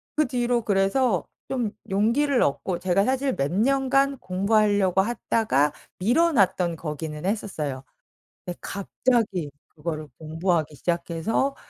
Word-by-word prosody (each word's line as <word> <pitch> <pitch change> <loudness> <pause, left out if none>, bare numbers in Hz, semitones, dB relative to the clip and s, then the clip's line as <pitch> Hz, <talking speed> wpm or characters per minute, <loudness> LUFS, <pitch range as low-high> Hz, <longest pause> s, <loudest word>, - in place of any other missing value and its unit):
그 305 0 +2
뒤로 245 -2 0
그래서 195 +1 +2 0.2
좀 240 -6 -1 0.2
용기를 240 +8 +2
얻고 170 +5 0
제가 185 +2 +2
사실 265 0 0
몇 140 +2 -1
년간 275 +5 +2
공부하려고 200 0 +2
하다가 215 - +1 0.3
미뤄 320 - +3
놨던 180 - +2
거기는 150 -1 -5
했었어요. 155 -10 -3 0.6
근데 175 - -6
갑자기 200 - -1 0.2
그거를 155 -1 -5
공부하기 160 -1 -1
시작해서 175 - -1
195 Hz, 275 characters per minute, -25 LUFS, 170-245 Hz, 0.6 s, 미뤄